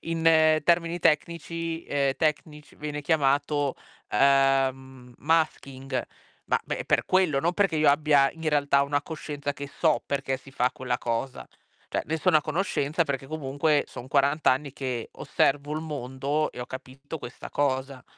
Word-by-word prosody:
in 160 -1 +3
termini 170 0 +2
tecnici 165 +1 -1
ehm, 140 -1 +1
tecnici 150 -1 -2
viene 150 0 -5
chiamato, 145 -1 +1 0.3
ehm, 135 -1 +2
masking. 135 -4 -1 0.5
Ma, - - +4
beh, - - -4
per - - +2
quello, 180 -7 +2
non 170 +2 +1
perché 190 -4 +1
io 150 -2 +5
abbia 145 -2 +4
in 160 -1 -4
realtà 145 -2 +3
una 145 0 0
coscienza 145 -3 -5
che 140 0 -7
so 155 +2 +1
perché 135 -2 -2
si 135 - -15
fa 125 -1 +1
quella 125 -1 -2
cosa. 120 +2 -3 0.4
Cioè, - - 0
ne 160 - -1
sono 160 -1 +4
a - - -3
conoscenza 160 -1 0
perché 135 -2 -3
comunque 145 0 0
son 125 - -10
40 140 +2 +1
anni 135 +1 +2
che 125 -4 -4
osservo 145 +2 0
il 155 - -2
mondo 145 0 -2
e - - -12
ho 125 - -3
capito 135 +4 -8
questa 120 - -9
cosa. 135 -2 -1
145 Hz, 155 wpm, -26 LUFS, 135-155 Hz, 0.5 s, io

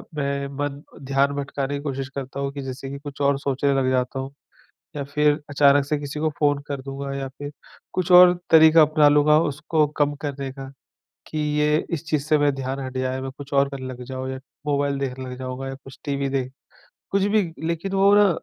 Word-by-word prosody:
मैं 140 -1 -2
मन 145 0 -3 0.2
ध्यान 140 +1 +2
भटकाने 140 0 -3
की 140 - -4
कोशिश 135 -2 -4
करता 135 0 -5
हूँ 140 0 -2
कि 140 - -5
जैसे 135 +1 -6
कि 140 - -6
कुछ 145 -1 -8
और 140 0 +3
सोचने 140 0 0
लग 135 -1 +1
जाता 130 +1 0
हूँ 135 +1 -5 0.6
या 145 - -3
फिर 150 +1 +2 0.2
अचानक 140 0 +4
से 150 +1 0
किसी 145 +1 -5
को 155 0 +1
फ़ोन 145 -1 +2
कर 140 -2 -4
दूँगा 135 +1 -6
या 135 -1 -3
फिर 145 0 -6 0.4
कुछ 185 -1 -1
और 180 0 +9 0.2
तरीका 160 0 +8
अपना 155 0 +5
लूँगा 150 +1 +5
उसको 150 +1 0
कम 145 0 +2
करने 140 -2 -4
का 135 0 -8 0.6
कि, 155 - -6
ये 150 +1 +1
इस 165 0 -3
चीज़ 150 -3 +1
से 155 0 +3
मैं 145 -1 +2
ध्यान 135 +1 -4
हट 130 0 -6
जाए। 130 0 -1
मैं 135 0 -5
कुछ 140 0 -9
और 140 0 +3
करने 135 -2 -7
लग 125 -1 -7
जाऊँ 130 0 -5
या 130 - -6 0.3
मोबाइल 140 -1 +1
देखने 130 -1 -4
लग 125 - -7
जाऊँगा 130 +1 -5
या 135 - -5
कुछ 135 +1 -13
टीवी 140 -1 -1
देख 130 0 -3 0.6
कुछ 195 0 +2
भी 205 +1 +3 0.3
लेकिन 170 +4 -3
वो 195 +1 +5
ना 205 -1 +6
140 Hz, 215 wpm, -23 LUFS, 135-150 Hz, 0.6 s, और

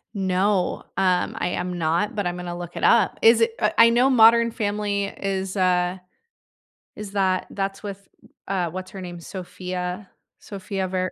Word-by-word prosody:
No, 190 0 0
um, 185 -2 +1
I 175 - -1
am 180 0 -3
not, 170 +5 0
but 205 -2 -2
I'm 175 0 -2
gonna 175 -1 -6
look 175 -1 -8
it - - -6
up. 220 -5 +4
Is 230 0 +6
it, 225 0 +2
uh 210 - +3
I 230 - +8
know 245 +3 +4
Modern 235 -1 +6
Family 205 -2 -1
is 195 -1 -4
a 180 -1 +1 0.9
is 210 -2 -8
that 190 -2 0
that's 195 0 -4
with, 200 -1 -8 0.4
uh, 185 -3 -1
what's 185 +2 -7
her 195 - -8
name? 175 -1 -7
Sofia, 180 +1 -6 0.3
Sofia 195 -1 -5
Ver 185 0 -2
190 Hz, 165 wpm, -23 LUFS, 180-205 Hz, 0.9 s, I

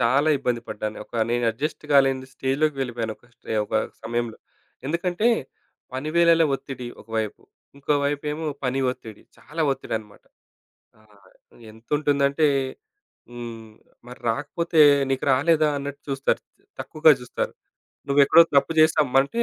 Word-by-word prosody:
చాలా 135 +6 +3
ఇబ్బంది 125 -3 -1
పడ్డాను. 105 +1 -4
ఒక - - -21 0.2
నేను 120 0 0
అడ్జస్ట్ 150 +7 -4
గాలేని 135 -1 +3
స్టేజ్‌లోకి 140 +3 0
వెళ్ళిపోయాను 115 -3 -3
ఒక - - -26
స్టే - - -6
ఒక - - -6 0.3
సమయంలో. 120 0 -3 0.5
ఎందుకంటే 175 +7 0 0.7
పని 135 +4 -3
వేళల 170 -1 +5
ఒత్తిడి 135 -2 -7
ఒకవైపు. 110 -2 -4 0.3
ఇంకో 140 +1 0
వైపు 145 +1 -1
ఏమో 160 +2 -4 0.2
పని 130 +1 0
ఒత్తిడి 110 -4 -10
చాలా 160 +2 -8
ఒత్తిడన్నమాట. 110 -5 -6 0.8
ఆహ్, 100 -3 -23 0.4
ఎంతుంటుందంటే 140 +5 +1 0.8
హ్మ్. 115 -2 -8 0.4
మరి 125 - -11
రాకపోతే 155 +6 -1 0.3
నీకు 135 -1 -1
రాలేదా 155 +3 +3
అన్నట్టు 140 0 -6
చూస్తారు. 135 0 0 0.4
తక్కువగా 155 0 +4
జూస్తారు. 125 - -4 0.6
నువ్వు 140 +1 +4
ఎక్కడో 165 +4 +7
తప్పు 140 +4 +3
జేసామంటే 150 - +3
135 Hz, 125 wpm, -24 LUFS, 120-150 Hz, 0.8 s, ఎక్కడో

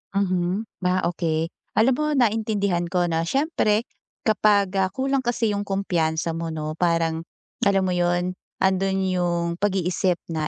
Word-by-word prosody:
Mhm, 185 +1 0 0.2
ah, 185 0 +1
okey. 165 -1 -1 0.2
Alam 240 +4 +4
mo 305 - +1
naintindihan 210 -7 +1
ko. 180 0 +1
Na 165 +1 0
siyempre 250 - +1 0.4
kapag, 205 -2 +3
ah, 190 - +3
kulang 270 +3 0
kasi 235 -2 0
'yung 205 0 -3
kumpiyansa 170 -4 0
mo 165 0 -4
'no, 155 0 -4
parang 165 -1 +1 0.4
alam 195 -1 +3
mo 185 - 0
'yun 175 +1 +1 0.3
andun 190 0 +2
'yung 175 -2 0
pag-iisip 185 -2 +1 0.2
na 155 -1 -1
185 Hz, 145 wpm, -24 LUFS, 170-205 Hz, 0.4 s, Alam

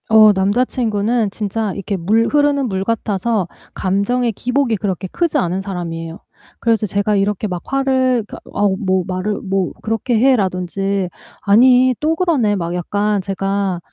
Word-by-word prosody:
어 215 -1 +7
남자친구는 220 +1 0
진짜 210 0 -2
이렇게 200 +1 -3
물 210 +6 +2
흐르는 290 -2 +2
물 190 -3 -2
같아서 210 -2 -1 0.3
감정의 220 +6 0
기복이 250 +2 0
그렇게 190 -2 -3
크지 335 - 0
않은 185 -6 0
사람이에요. 170 -3 -5 0.4
그래서 225 -2 +1
제가 205 +2 0
이렇게 205 +1 0
막 180 -3 -4
화를 260 -3 +1
그러니까 - - -9
어우 200 -1 0
뭐 190 -2 +1
"말을 185 +3 -2
뭐 190 -2 -1
그렇게 225 +1 0
해."라든지 195 -5 +1 0.3
"아니 250 +4 +5
또 315 +2 +1
그러네." 295 - +1
막 170 -2 -3
약간 205 +3 -1
제가 195 -1 -2
205 Hz, 330 characters per minute, -18 LUFS, 190-240 Hz, 0.4 s, 어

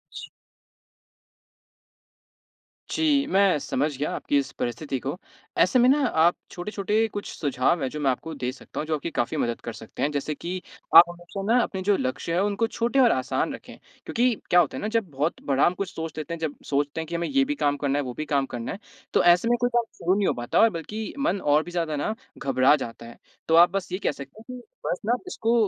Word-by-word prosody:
जी। - - -7 2.6
जी, 290 -3 +2
मैं 195 - +4
समझ 145 +2 -1
गया 145 - -2
आपकी 145 - 0
इस 140 - -1
परिस्थिति 130 +3 -3
को। 140 +7 -4 0.4
ऐसे 255 - +4
में 245 - +5
ना 285 +3 +4
आप 170 -3 +3 0.2
छोटे-छोटे 210 +4 -1
कुछ 205 - -4
सुझाव 145 +2 0
हैं 130 - -1
जो 150 - -6
मैं 140 - +2
आपको 160 +5 -5
दे 125 -3 -2
सकता 130 - -9
हूँ 155 - -3
जो 160 - +1
आपकी 150 +3 -4
काफ़ी 120 - -1
मदद 120 -1 -1
कर 120 - -6
सकते 110 0 -10
हैं। 145 - +1
जैसे 145 +1 -2
कि 180 +4 -5 0.4
आप 165 - +13
हमेशा 175 +3 -8
ना 250 - +5
अपने 190 -2 -4
जो 205 +1 +3
लक्ष्य 130 +6 -2
हैं 175 - +2
उनको 205 +3 +1
छोटे 235 +4 0
और 245 -3 +6
आसान 130 -1 -1
रखें। - - -11 0.3
क्योंकि 245 +1 +2 0.2
क्या 180 - +6
होता 165 -5 +1
है - - -5
ना 210 - -2
जब 210 -6 -2
बहुत 145 +4 -2
बड़ा 135 -1 +3
हम 175 - +3
कुछ 190 0 -5
सोच 160 0 -6
लेते 155 +2 -4
हैं 170 - -5
जब 160 -3 -3
सोचते 145 +2 0
हैं - - -5
कि 170 - -4
हमें 170 0 -1
ये 275 -1 +2
भी 295 +2 -2
काम 145 - +1
करना 140 0 0
है - - -1
वो 125 - -5
भी 155 - -3
काम 140 -2 +1
करना 115 -1 -4
है। 200 - -6 0.3
तो - - +4
ऐसे 175 +5 +5
में 240 - +3
कोई 245 - +3
काम 240 - +4
शुरू 180 +3 +1
नहीं 205 - +1
हो - - +2
पाता 120 - +3
बल्कि 210 +4 -6
मन 275 -8 +1
और 150 +1 +3
भी 175 - -9
ज़्यादा 165 -3 -1
ना 145 +9 -1 0.2
घबरा 135 +1 +4
जाता 115 -5 -7
है। 115 - -12 0.3
तो 165 - +4
आप 170 +1 +8
बस 195 -2 -3
ये 185 - -1
कह - - +2
सकते 140 +7 -11
हैं - - -6
कि - - -12 0.2
बस - - -1
ना 230 - +2
इसको 230 -10 0
165 Hz, 235 wpm, -25 LUFS, 140-205 Hz, 2.6 s, आप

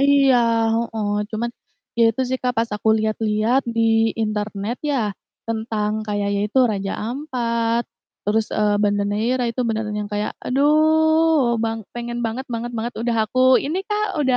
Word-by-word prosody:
Iya, 275 -2 +5 0.4
heeh, 225 -2 -2 0.2
cuman 230 +2 -2 0.5
ya 230 - +6
itu 260 +4 -2
sih, 260 - 0
Kak, 250 -1 -1
pas 230 0 +1
aku 220 - -1
lihat-lihat 220 +3 +1
di 225 -1 +2
internet 215 +1 -2
ya 245 -9 0 0.4
tentang 220 -1 -2
kayak 205 -1 -1
ya 200 - 0
itu, 240 +5 0
Raja 195 -1 -2 0.2
Ampat 235 -4 -1 0.4
terus, 215 +1 +1
eee, 210 -1 +2
Banda 205 -1 +2
Neira 230 +5 0
itu 240 +2 -4
beneran 215 -2 -2
yang 210 - -3
kayak 210 +1 -1
aduh 310 -1 +3
bang 225 0 -2
pengen 240 0 -4
banget 240 +4 -3
banget 240 0 -4
banget, 235 +2 -3
udah 235 0 -1
aku 255 +4 -1 0.2
ini, 340 +7 -2
Kak, 420 -1 -2
udah 260 -2 +2
230 Hz, 160 wpm, -21 LUFS, 215-255 Hz, 0.5 s, ya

